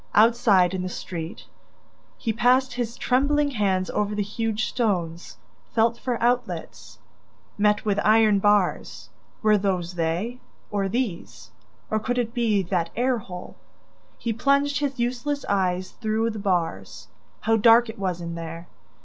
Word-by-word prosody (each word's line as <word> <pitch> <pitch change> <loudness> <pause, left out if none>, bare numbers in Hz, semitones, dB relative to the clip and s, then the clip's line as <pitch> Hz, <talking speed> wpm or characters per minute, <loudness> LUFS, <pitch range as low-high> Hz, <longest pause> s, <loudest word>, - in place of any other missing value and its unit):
Outside, 210 -5 +4
in 185 - -2
the 185 - -3
street, 170 -2 -6 0.7
he 225 - -2
passed 255 +3 +3
his 240 -2 -3
trembling 285 +3 +2
hands 190 -6 0
over 210 0 -1
the 205 - 0
huge 220 +2 -2
stones, 175 -8 -2 0.4
felt 230 +1 +3
for 245 -3 -2
outlets... 245 +1 -2 0.6
met 210 +1 +2
with 205 -1 +1
iron 215 -1 +5
bars... 205 -2 +1 0.3
were 215 -1 +4
those 185 -3 -1
they?... 175 +9 -2 0.3
Or 200 -2 0
these?... 115 - -4 0.4
Or 215 - +2
could 245 +3 -2
it 235 -2 -1
be 225 -5 +1
that 175 -2 -1
air 245 0 +1
hole?... 180 -3 -9 0.6
He 230 - -2
plunged 280 +4 +2
his 280 -2 -2
useless 255 +4 -2
eyes 185 -2 0
through 220 0 -1
the 215 - -6
bars... 170 - -2 0.3
How 225 0 +2
dark 230 +2 +6
it 220 -1 -8
was 180 -3 -2
in 170 0 -5
there! 165 0 -7
210 Hz, 145 wpm, -24 LUFS, 185-240 Hz, 0.7 s, dark